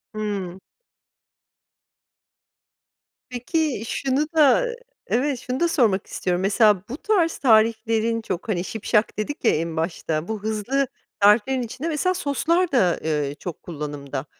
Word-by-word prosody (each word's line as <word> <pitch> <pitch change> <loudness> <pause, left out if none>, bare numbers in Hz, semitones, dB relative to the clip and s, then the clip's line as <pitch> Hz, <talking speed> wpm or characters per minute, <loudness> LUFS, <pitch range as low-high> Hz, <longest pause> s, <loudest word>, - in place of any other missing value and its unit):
Hımm. 200 -4 -4 2.7
Peki, 255 0 -1
şunu 275 +4 0
da 310 - +5 0.4
evet, 265 +1 0
şunu 255 +1 -4
da 340 - +3
sormak 230 - +1
istiyorum, 180 -1 -2
mesela, 205 -1 +3
bu 260 - -5
tarz 350 -4 +1
tariflerin 225 -1 +2
çok, 190 +1 -5
hani, 175 -4 0
şipşak 215 +1 0
dedik 250 +6 -4
ya - - +6
en 165 +1 -2
başta, 160 -1 -2
bu 220 -2 -4
hızlı 220 +6 0 0.3
tariflerin 215 +6 +4
içinde 250 +6 -5
mesela 335 +4 +1
soslar 335 +3 0
da, 185 -11 +2
eee, 150 -3 -1
çok 175 -4 -7
kullanımda. 145 -4 -5
220 Hz, 125 wpm, -23 LUFS, 185-275 Hz, 2.7 s, ya